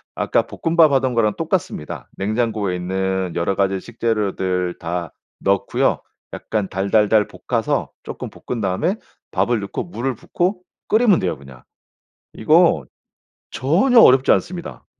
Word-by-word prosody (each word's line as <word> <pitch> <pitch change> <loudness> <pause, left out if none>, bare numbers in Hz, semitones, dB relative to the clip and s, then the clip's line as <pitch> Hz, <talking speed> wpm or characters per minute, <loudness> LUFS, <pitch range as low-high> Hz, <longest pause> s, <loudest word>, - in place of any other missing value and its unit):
아까 - - +1
볶음밥 165 -2 +3
하던 130 -2 +2
거랑 110 -3 +1
똑같습니다. 75 - -3
냉장고에 105 -2 -1
있는 95 0 -2
여러 85 +3 0
가지 95 -1 +1
식재료들 95 -6 -2
다 85 0 -4 0.3
넣고요. 100 -1 +1 0.3
약간 105 -3 -3
달달달 105 +2 +2
볶아서 - - -2
조금 - - -7
볶은 120 -3 -6
다음에 95 - 0 0.4
밥을 120 -2 +1
넣고 100 -1 -4
물을 120 +8 -3
붓고 180 - -2 0.3
끓이면 215 -4 +4
돼요, - - -2
그냥. 65 -3 -14 0.7
이거 - - +3 0.6
전혀 175 - +3
어렵지 130 - +6
않습니다. 175 0 -2
105 Hz, 290 characters per minute, -20 LUFS, 95-130 Hz, 0.7 s, 어렵지